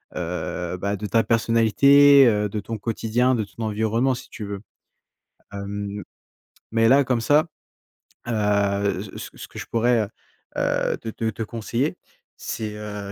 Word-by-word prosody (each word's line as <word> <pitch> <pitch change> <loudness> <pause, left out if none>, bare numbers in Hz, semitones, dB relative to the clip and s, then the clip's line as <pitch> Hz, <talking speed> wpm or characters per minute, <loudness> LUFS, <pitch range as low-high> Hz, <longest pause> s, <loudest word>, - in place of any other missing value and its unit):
heu, 90 0 -4
bah, 100 +2 -2
de 105 - -6
ta 115 +1 +2
personnalité, 130 +5 +5
heu, 105 -2 +2
de 105 +1 -4
ton 110 +2 -5
quotidien, 115 +3 0
de 110 -3 0
ton 105 +3 -8
environnement, 110 +4 +1
si 120 - -8
tu 105 - -7
veux. 100 -1 -6 0.9
Hem, 100 0 -5 0.7
mais 115 0 +3
là 135 +2 +5
comme 125 -2 0
ça. 150 +6 +4 0.8
Heu 100 -3 +1
c 100 - -10
c - - -7
ce - - -9
que - - -10
je - - -6
pourrais 115 0 +2
heu - - -5 0.5
heu - - 0
te 115 - -7
te 110 0 -2
te 115 - -5
conseiller, 120 +8 -2 0.4
c'est 110 -1 -5
heu, 105 -1 -6
110 Hz, 160 wpm, -23 LUFS, 100-115 Hz, 0.9 s, personnalité